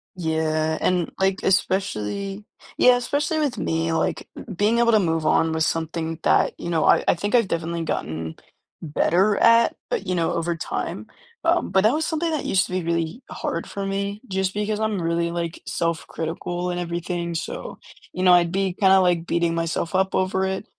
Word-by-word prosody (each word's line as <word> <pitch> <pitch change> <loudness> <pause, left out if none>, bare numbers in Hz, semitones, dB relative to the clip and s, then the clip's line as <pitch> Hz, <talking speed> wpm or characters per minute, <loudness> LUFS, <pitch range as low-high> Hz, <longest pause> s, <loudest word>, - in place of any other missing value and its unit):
Yeah, 160 -2 0
and, 180 -2 +1
like, 190 0 +2
especially 195 - -1 0.3
yeah, 250 0 +6
especially 290 +5 -1
with 275 -7 -1
me, 165 0 -1
like, - - -1
b - - -8
being 215 +5 +2
able 235 0 +4
to 215 - +5
move 165 -3 0
on 160 +1 +3
with 160 0 +1
something 165 0 -2
that - - +3
you 170 - -5
know, 160 -2 +1
I - - +5
I - - +4
think 205 +6 -3
I've 230 -5 +4
definitely 170 0 -2
gotten 80 - -3 0.5
better 180 +6 +2
at, 230 0 +5
but, 195 - -2
you 185 - 0
know, 165 -1 0
over 170 0 -1
time, 165 - -4 0.4
um, 340 - +2
but 190 0 +4
that 220 +5 +4
was 315 +1 0
something 325 +1 -1
that 305 - -2
used 190 - +2
to - - -10
be 185 -2 -1
really 170 +7 -2
hard - - -4
for 200 -1 -4
me 200 +1 -3
just 190 0 -1
because 210 +1 -2
I'm 215 -4 -1
really, 170 0 0
like, 170 -1 -4
self-critical 170 +1 -3
and 175 - -3
everything, 170 0 -3
so, - - -5 0.3
you 185 - -3
know, 180 -1 +7
I'd 170 -1 +4
be 190 -1 0
kind 190 0 +3
of, 190 -1 +6
like, 175 -2 +1
beating 170 -1 +1
myself 165 +1 -2
up 190 0 +1
over 190 0 +1
it, 190 0 -3
180 Hz, 195 wpm, -23 LUFS, 165-200 Hz, 0.5 s, know